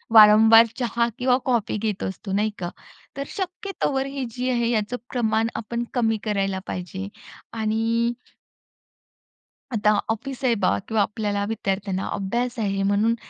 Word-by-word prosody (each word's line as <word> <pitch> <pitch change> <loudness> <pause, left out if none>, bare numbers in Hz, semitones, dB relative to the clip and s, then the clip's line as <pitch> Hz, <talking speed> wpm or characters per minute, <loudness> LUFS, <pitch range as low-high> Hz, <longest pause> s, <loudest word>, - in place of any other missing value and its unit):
वारंवार 220 +1 +9
चहा 235 -1 +1
किंवा 250 0 +3
कॉफी 235 -5 +1
घेत 210 -2 -2
असतो, 190 +1 -5
नाही 210 +2 +1
का? 175 -1 -3 0.5
तर 275 - -1
शक्यतोवर 365 -7 -2
ही 275 -1 -4
जी 255 +2 -2
आहे 235 -1 +1
याचं 225 +2 -1 0.2
प्रमाण 225 -2 +1
आपण 235 +2 -3
कमी 225 -2 +2
करायला 195 -3 0
पाहिजे. 190 +2 -5 0.5
आणि 225 +2 0 1.6
आता 210 -1 +3 0.2
ऑफिस 265 +4 -4
आहे 240 -2 +3
बा 185 - +2
किंवा 220 -1 +1
आपल्याला 205 0 -1
विद्यार्थ्यांना 195 -3 -2
अभ्यास 235 +5 -2
आहे 195 -2 0
म्हणून 205 +3 +2
220 Hz, 135 wpm, -24 LUFS, 205-240 Hz, 1.6 s, वारंवार